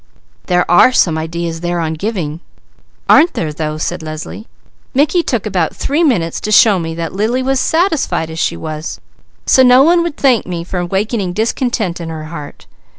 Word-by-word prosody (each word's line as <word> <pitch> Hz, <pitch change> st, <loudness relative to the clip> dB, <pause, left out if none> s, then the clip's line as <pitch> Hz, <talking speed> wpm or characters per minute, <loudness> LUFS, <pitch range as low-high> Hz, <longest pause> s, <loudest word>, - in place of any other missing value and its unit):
"There 180 Hz, -1 st, +2 dB, 0.2 s
are 255 Hz, -, +5 dB
some 170 Hz, -10 st, +2 dB
ideas 165 Hz, +1 st, -4 dB
there 175 Hz, 0 st, -2 dB
on 160 Hz, -1 st, -2 dB
giving!" 165 Hz, -4 st, -4 dB, 0.7 s
"Aren't 330 Hz, +3 st, +5 dB
there 155 Hz, -3 st, -2 dB
though!" 155 Hz, 0 st, -3 dB
said 175 Hz, +3 st, -3 dB
Leslie. 155 Hz, +7 st, -7 dB, 0.5 s
"Mickey 300 Hz, +6 st, +3 dB
took 240 Hz, -, -2 dB
about 185 Hz, -6 st, -1 dB
three 300 Hz, +5 st, 0 dB
minutes 175 Hz, -, +1 dB
to 215 Hz, -, -3 dB
show 205 Hz, -1 st, +5 dB
me 165 Hz, -1 st, -4 dB
that 165 Hz, -1 st, -4 dB
Lily 225 Hz, +6 st, 0 dB
was 265 Hz, 0 st, +1 dB
satisfied 310 Hz, -, 0 dB
as 160 Hz, -, -6 dB
she 85 Hz, -, -1 dB
was, 155 Hz, -, -6 dB, 0.5 s
so 260 Hz, -, +5 dB
no 255 Hz, +1 st, +6 dB
one 340 Hz, +3 st, +4 dB
would 340 Hz, -3 st, -3 dB
thank 255 Hz, -5 st, +2 dB
me 175 Hz, -2 st, -4 dB
for 180 Hz, +1 st, -4 dB
awakening 195 Hz, +2 st, -2 dB
discontent 220 Hz, -4 st, -1 dB
in 165 Hz, -, -6 dB
her 160 Hz, -1 st, -6 dB
heart. 155 Hz, -2 st, -9 dB
180 Hz, 180 wpm, -15 LUFS, 165-250 Hz, 0.7 s, no